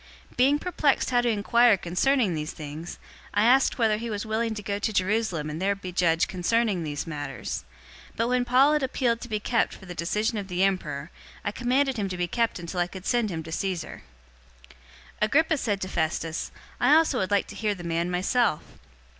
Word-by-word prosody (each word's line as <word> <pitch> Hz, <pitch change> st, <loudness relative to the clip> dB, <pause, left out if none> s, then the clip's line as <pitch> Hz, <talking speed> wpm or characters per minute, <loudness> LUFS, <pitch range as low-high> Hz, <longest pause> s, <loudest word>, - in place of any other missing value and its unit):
025:020 -, -, -22 dB
Being 270 Hz, +4 st, +4 dB
perplexed 300 Hz, -4 st, +1 dB
how 245 Hz, -1 st, +4 dB
to 240 Hz, -, +1 dB
inquire 230 Hz, +1 st, +4 dB
concerning 195 Hz, +5 st, +1 dB
these 155 Hz, 0 st, -4 dB
things, 155 Hz, +2 st, -7 dB, 0.4 s
I 205 Hz, -, +4 dB
asked 255 Hz, +4 st, +4 dB
whether 220 Hz, -3 st, +2 dB
he 230 Hz, +2 st, -5 dB
was 210 Hz, -1 st, -3 dB
willing 220 Hz, +1 st, -1 dB
to 210 Hz, -, -6 dB
go 200 Hz, +1 st, -2 dB
to 220 Hz, -, -1 dB
Jerusalem 190 Hz, -5 st, 0 dB
and 155 Hz, +3 st, -5 dB
there 200 Hz, +1 st, +1 dB
be 185 Hz, -2 st, -7 dB
judged 170 Hz, -2 st, +2 dB
concerning 200 Hz, +1 st, 0 dB
these 150 Hz, -2 st, -4 dB
matters. 145 Hz, -8 st, -5 dB, 0.5 s
025:021 -, -, -28 dB
But 230 Hz, -, +1 dB
when 250 Hz, 0 st, +1 dB
Paul 265 Hz, +4 st, +5 dB
had 300 Hz, -, +2 dB
appealed 245 Hz, -3 st, 0 dB
to 245 Hz, -, -8 dB
be 215 Hz, -1 st, -1 dB
kept 230 Hz, +2 st, 0 dB
for 190 Hz, -, -13 dB
the 180 Hz, -, -7 dB
decision 210 Hz, +6 st, -1 dB
of 200 Hz, -, -6 dB
the 180 Hz, 0 st, 0 dB
emperor, 165 Hz, -6 st, -1 dB, 0.3 s
I 205 Hz, -, 0 dB
commanded 260 Hz, +3 st, +1 dB
him 200 Hz, -2 st, -1 dB
to 180 Hz, -, -4 dB
be 175 Hz, -, 0 dB
kept 230 Hz, +5 st, 0 dB
until 175 Hz, +1 st, -5 dB
I 175 Hz, -, +2 dB
could 190 Hz, +1 st, -10 dB
send 240 Hz, -3 st, +1 dB
him 165 Hz, -3 st, -4 dB
to 160 Hz, -, -9 dB
Caesar." 180 Hz, -2 st, -3 dB, 0.7 s
025:022 -, -, -17 dB, 0.5 s
Agrippa 315 Hz, +4 st, +3 dB
said 205 Hz, -5 st, -1 dB
to 190 Hz, -, -2 dB
Festus, 160 Hz, -2 st, -2 dB, 0.3 s
"I 275 Hz, +5 st, +5 dB
also 315 Hz, -5 st, +3 dB
would 190 Hz, -, -1 dB
like 205 Hz, -1 st, +2 dB
to 210 Hz, -, -9 dB
hear 210 Hz, 0 st, -1 dB
the 175 Hz, -, -9 dB
man 170 Hz, +1 st, -1 dB
myself." 185 Hz, +1 st, +1 dB
205 Hz, 215 wpm, -26 LUFS, 175-240 Hz, 0.7 s, Paul